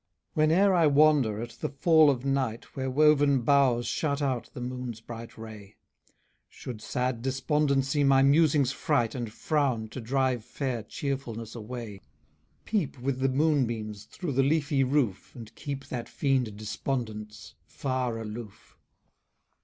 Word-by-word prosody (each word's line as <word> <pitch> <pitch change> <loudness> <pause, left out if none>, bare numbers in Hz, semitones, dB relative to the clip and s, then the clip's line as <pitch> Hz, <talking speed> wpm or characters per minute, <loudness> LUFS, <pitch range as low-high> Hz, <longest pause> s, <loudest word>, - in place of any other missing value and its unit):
Whene'er 165 +6 +4
I 170 -3 +4
wander, 145 -7 +4
at 120 - -7
the - - -1
fall 155 +2 +5
of 130 -2 -1
night, 135 -5 -2
Where 130 -1 -2
woven 145 -1 +4
boughs 130 -3 +3
shut 145 -3 -1
out 130 -4 -1
the - - -6
moon's 125 -2 -5
bright 115 0 -9
ray, 110 -2 -10 0.7
Should 115 -4 -8
sad 125 0 -2
Despondency 135 +1 +1
my 135 -1 +5
musings 140 -2 +4
fright, 135 -5 0
And 120 -4 -4
frown, 130 -4 -1
to 130 - -7
drive 130 0 0
fair 125 0 -3
Cheerfulness 115 -2 -5
away, 115 -3 -7 0.6
Peep 200 -11 -1
with 130 +1 -2
the 135 0 +2
moon 145 -1 +2
beams 110 -3 -5
through 175 -5 -5
the 135 - +3
leafy 140 -1 +2
roof, 130 -7 -1
And 115 -3 -10
keep 140 -1 -6
that 120 -2 -5
fiend 130 -7 0
Despondence 110 -1 -5
far 130 -3 -2
aloof. 110 -1 -8
130 Hz, 140 wpm, -28 LUFS, 115-140 Hz, 0.7 s, fall